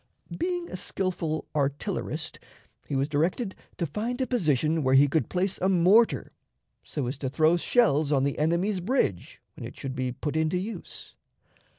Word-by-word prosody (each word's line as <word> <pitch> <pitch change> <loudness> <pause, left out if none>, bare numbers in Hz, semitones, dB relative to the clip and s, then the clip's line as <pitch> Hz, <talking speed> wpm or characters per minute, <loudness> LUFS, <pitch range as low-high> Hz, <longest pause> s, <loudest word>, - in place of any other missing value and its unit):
Being 350 0 -2
a - - -4
skillful 175 -5 -2
artillerist, 155 +2 -2 0.5
he 140 - -3
was 135 +1 +1
directed 175 - 0 0.2
to 170 - -1
find 225 - -3
a 260 - +1
position 160 - +1
where 130 -1 +3
he 140 +2 +7
could 155 +3 0
place 185 +1 -1
a 190 - +3
mortar 195 +6 +4 0.5
so 145 -4 -4
as 125 +4 -4
to 135 - -2
throw 155 +4 +3
shells 155 - +2
on 135 -2 +3
the 140 0 -1
enemy's 175 +6 +1
bridge 180 - -1
when - - -9
it - - -8
should 135 -1 -5
be 130 -1 -1
put 145 +5 -4
into 160 +2 +1
use. 210 +5 -7
160 Hz, 170 wpm, -27 LUFS, 145-195 Hz, 0.5 s, he